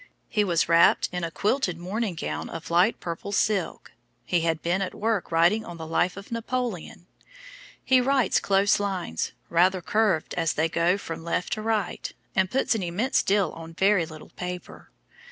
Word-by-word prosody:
He 210 - +2
was 175 -4 +1
wrapped 170 0 +5
in 180 -1 -3
a 170 - -1
quilted 200 - 0
morning 190 +3 -3
gown - - -4
of 165 0 -7
light 180 +7 +3
purple 170 +3 -5
silk; 205 0 -1 0.3
he 175 -2 +1
had 165 -1 -1
been 175 +3 0
at 185 - -3
work 220 -4 -1
writing 175 +7 +3
on 175 - -9
the 160 - -7
'Life 175 +3 0
of 200 +3 -10
Napoleon.' 230 -5 -4 0.8
He 260 -1 +5
writes 260 -4 +2
close 200 +1 +3
lines, 185 - -2
rather 180 +3 +3
curved 200 -1 +1
as 165 -2 0
they 160 +2 +1
go 170 +3 +2
from 165 -4 -7
left 170 +1 -1
to 215 - -3
right, 220 -1 -2 0.2
and 190 -1 +2
puts 265 +3 +1
an 220 - -2
immense 185 +9 +1
deal 200 -1 +1
on 165 0 -10
very 190 -3 +3
little 155 -1 -11
paper. 180 0 -7
185 Hz, 175 wpm, -26 LUFS, 170-210 Hz, 0.8 s, wrapped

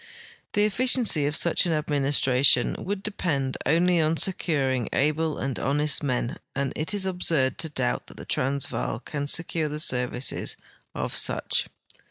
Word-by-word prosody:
The 205 0 +3
efficiency 220 - +3
of 150 - -1
such 170 +2 +3
an 165 - +1
administration 140 -4 +3
would 200 +1 -4
depend 145 -10 -2
only 170 +3 +3
on 160 +1 +1
securing 135 - 0
al^le 155 +2 0
and 135 -3 -3
honest 145 +2 +1
men, 125 -4 -2 0.2
and 135 0 -1
it 155 - -2
is 195 -2 +1
absurd 165 -8 0
to 160 - -1
doubt 65 - -2
that - - -12
the - - -9
Transvaal 125 - -2
can 145 -1 -4
secure 160 0 0
the 150 +1 -5
services 125 -3 -1 0.4
of - - -3
such. - - +1
150 Hz, 150 wpm, -25 LUFS, 135-170 Hz, 0.4 s, The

